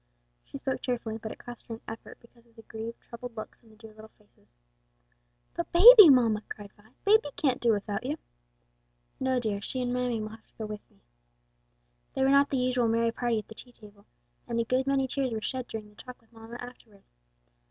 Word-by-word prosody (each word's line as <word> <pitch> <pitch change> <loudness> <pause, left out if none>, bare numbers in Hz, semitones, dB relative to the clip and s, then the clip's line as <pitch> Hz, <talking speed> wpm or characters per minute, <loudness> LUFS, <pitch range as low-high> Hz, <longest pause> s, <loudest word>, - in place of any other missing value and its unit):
She - - -9
spoke 270 -1 -3
cheerfully, 235 -3 -3
but 220 0 -6
it - - -9
cost 240 -1 -11
her 230 - -5
an 225 - -15
effort 225 +1 -9
because 235 0 -23
of 230 - -29
the 225 - -14
grieved, 225 +1 -7
troubled 235 0 -9
looks 215 - -8
on 225 - -21
the 215 - -19
dear 220 0 -14
little 220 0 -14
faces. 205 - -31 1.0
"But 340 - -4
baby, 420 +1 +10
mamma!" 230 -6 +4
cried 205 -1 -9
Vi, 210 +1 -23 0.2
"baby 425 -5 +4
can't 275 -8 0
do 235 - +3
without 205 +1 -2
you!" 285 +5 -3 1.0
"No, 260 -1 +1
dear, 210 -4 -2
she 255 - -4
and 245 -1 -1
mammy 250 -2 -1
will 215 0 -5
have 220 0 -14
to - - -37
go 220 - -4
with 210 0 -8
me." - - -30 1.1
They - - +1
were 265 - +4
not 280 0 +5
the 270 - -1
usual 250 -1 +1
merry 230 +1 +1
party 235 -1 -1
at 215 - -5
the - - -11
tea 245 +2 -12
table, 205 -2 -17 0.4
and 235 -1 -2
a - - +2
good 255 +3 0
many 270 -1 +1
tears 260 -2 -2
were 220 - -2
shed 255 +3 -4
during 215 -1 -7
the 210 - -23
talk 250 +3 -11
with 230 0 -31
mamma 225 +1 -11
afterward. 235 -5 -12
235 Hz, 220 wpm, -28 LUFS, 220-255 Hz, 1.1 s, baby